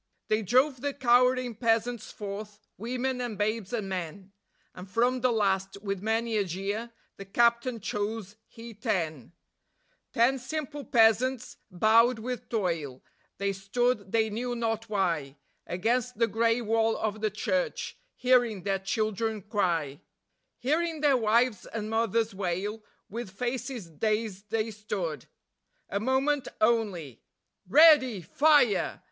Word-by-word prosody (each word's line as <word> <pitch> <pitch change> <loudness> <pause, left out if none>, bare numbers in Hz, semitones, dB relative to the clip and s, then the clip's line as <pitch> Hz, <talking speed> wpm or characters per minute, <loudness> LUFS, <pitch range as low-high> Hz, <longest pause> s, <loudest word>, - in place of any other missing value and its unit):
They 215 +1 +2
drove 255 +5 +2
the 285 0 -2
cowering 250 -1 +3
peasants 230 +1 0
forth, 205 +1 -7 0.2
women 250 +3 -2
and 235 -4 -4
babes 210 -1 -1
and 220 -5 -2
men, 185 +1 -5 0.4
And 180 +1 -10
from 245 +5 +1
the 255 0 +3
last, 195 -3 0
with 195 -2 -3
many 225 +1 0
a 205 - +2
jeer, 195 +6 -4 0.3
the 195 - -8
Captain 235 +3 +2
chose 210 0 -4
he 230 0 -11
ten; 170 - -3 0.8
Ten 255 +3 +3
simple 295 +2 -5
peasants, 235 +3 +2
bowed 225 +6 +4
with 245 +2 -5
toil; 165 - -2 0.3
they 200 0 -1
stood, 200 +1 -1
they 220 -1 +2
knew 245 +3 -3
not 225 -1 -2
why, 170 -9 -1 0.3
Against 235 +6 -1
the 230 - +4
grey 230 +1 +1
wall 225 0 +1
of 215 -1 -3
the 215 - +1
church, 240 +7 -2 0.2
hearing 245 -6 +2
their 195 0 0
children 215 +1 -2
cry; 170 -9 -1 0.6
Hearing 315 +4 -1
their 290 -3 +4
wives 235 -1 +2
and 220 -1 -5
mothers 225 -1 +1
wail, 195 +3 -3 0.2
with 230 0 -6
faces 240 0 -4
dazed 210 +2 -2
they 225 0 -1
stood. 205 -6 -4 0.6
A 200 - -1
moment 265 +4 +1
only.... 205 - 0 0.5
_READY! 260 - +6
FIRE! 290 - +3
220 Hz, 130 wpm, -28 LUFS, 200-245 Hz, 0.8 s, READY